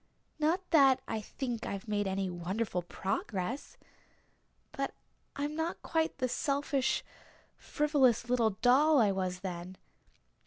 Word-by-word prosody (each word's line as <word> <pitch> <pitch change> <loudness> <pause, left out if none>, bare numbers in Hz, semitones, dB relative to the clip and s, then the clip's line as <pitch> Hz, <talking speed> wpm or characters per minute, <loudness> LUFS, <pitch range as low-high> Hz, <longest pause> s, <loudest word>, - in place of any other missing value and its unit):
Not 335 +5 +1
that 275 -5 +6
I 220 -1 -2
think 240 0 -4
I've 200 +2 -5
made 205 -1 0
any 190 0 -1
wonderful 180 +2 -2
progress 195 - -3 0.9
but - - -3 0.4
I'm 290 +1 -2
not 325 +2 -3
quite 320 -1 0
the 255 -2 0
selfish, 275 0 0 0.5
frivolous 270 -6 +2
little 240 -2 +3
doll 285 +4 +6
I 210 -4 +4
was 185 -1 -2
then. 185 -1 -6
245 Hz, 120 wpm, -32 LUFS, 195-290 Hz, 0.9 s, that